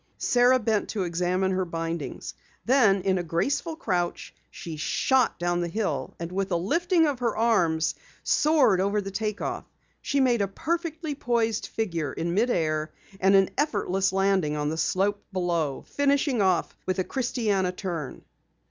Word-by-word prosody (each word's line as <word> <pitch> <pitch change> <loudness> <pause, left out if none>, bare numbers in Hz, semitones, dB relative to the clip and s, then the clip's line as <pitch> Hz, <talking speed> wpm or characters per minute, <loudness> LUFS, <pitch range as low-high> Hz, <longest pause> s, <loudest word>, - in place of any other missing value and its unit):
Sara 250 +1 +4
bent 220 -3 0
to 205 -4 -2
examine 180 +2 0
her 185 0 0
bindings. 165 -1 -4 0.3
Then 220 -7 +4
in 190 -1 +1
a - - -2
graceful 265 - -1
crouch 180 - -2 0.2
she 165 -2 -8
shot 255 - +1
down 175 0 0
the 175 - -1
hill 165 -9 -3
and 170 +1 -5
with 195 +1 -2
a - - +2
lifting 330 - +2
of 285 -4 -1
her 235 -3 -1
arms 170 -9 +2 0.3
soared 285 - +3
over 200 +2 +1
the 195 -1 -5
take 215 0 -3
off. - - -4 0.3
She 280 - 0
made 245 -4 +3
a 200 - +1
perfectly 320 - -3
poised 230 -5 0
figure 170 -10 -2
in 170 +1 -2
mid 225 +6 +2
air 155 -5 0 0.3
and 195 +1 +4
an 195 -1 +4
effortless 195 - +1
landing 190 -5 +1
on 150 0 -1
the 160 - -2
slope 200 +5 0
below, 170 -7 -1
finishing 280 -3 +1
off 185 -3 +1
with 185 - 0
a 185 - +1
christiana 215 -7 0
turn. 175 -6 -5
195 Hz, 165 wpm, -26 LUFS, 175-240 Hz, 0.3 s, Sara